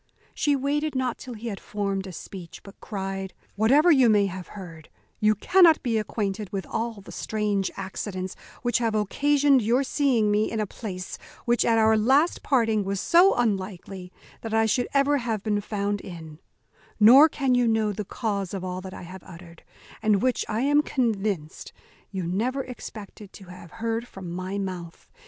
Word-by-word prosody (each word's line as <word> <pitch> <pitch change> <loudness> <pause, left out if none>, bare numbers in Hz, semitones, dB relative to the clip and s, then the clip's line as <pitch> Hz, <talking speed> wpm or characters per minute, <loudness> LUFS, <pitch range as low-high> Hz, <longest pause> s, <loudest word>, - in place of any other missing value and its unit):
She 290 -1 +1
waited 290 +2 -1
not 255 -2 -1
till 250 -2 -8
he 230 +2 -6
had 200 - -5
formed 195 -2 -3
a - - -7
speech; 180 0 -10
but 195 - -14
cried, 195 -2 -5 0.2
"Whatever 275 - +5
you 260 -6 +5
may 205 -2 +4
have 185 -1 -6
heard, 165 -5 -10 0.3
you 215 -1 +3
cannot 335 - +5
be 230 -4 +1
acquainted 210 -2 -3
with 195 -1 -3
all 225 -2 -4
the - - -12
strange 210 -3 -1
accidents 190 -1 -5 0.3
which 240 -1 +1
have 225 -2 0
occasioned 280 +6 +3
your 240 +5 +2
seeing 255 -7 +1
me 210 +1 +2
in 225 - -2
a 215 - 0
place 185 -3 -7 0.3
which 240 -1 +2
at 230 -1 +3
our 220 0 +4
last 270 +10 +3
parting 225 -6 +2
was 195 0 -2
so 355 - +5
unlikely 190 -4 -3 0.3
that 225 -1 -3
I 225 0 +4
should 230 +3 +1
ever 285 +1 +3
have 225 -5 -3
been 210 -2 0
found 205 -1 -2
in; 160 -4 -10 0.6
nor 260 +9 +8
can 270 -4 0
you 245 -1 +3
know 220 -2 +2
the 210 - -4
cause 200 -2 -3
of 190 - -5
all 185 0 -4
that 190 0 -8
I - - -9
have 185 +2 -10
uttered, 170 -1 -13 0.4
and 215 -2 +3
which, 255 -1 +1
I 220 +2 -1
am 290 +2 +4
convinced, 210 - -2 0.4
you 190 -2 -4
never 240 +10 -1
expected 210 -4 -10
to 200 - -12
have 180 -1 -11
heard 230 +1 -3
from 185 -6 -9
my 185 +3 -4
mouth. 180 -4 -6
215 Hz, 180 wpm, -25 LUFS, 195-245 Hz, 0.6 s, nor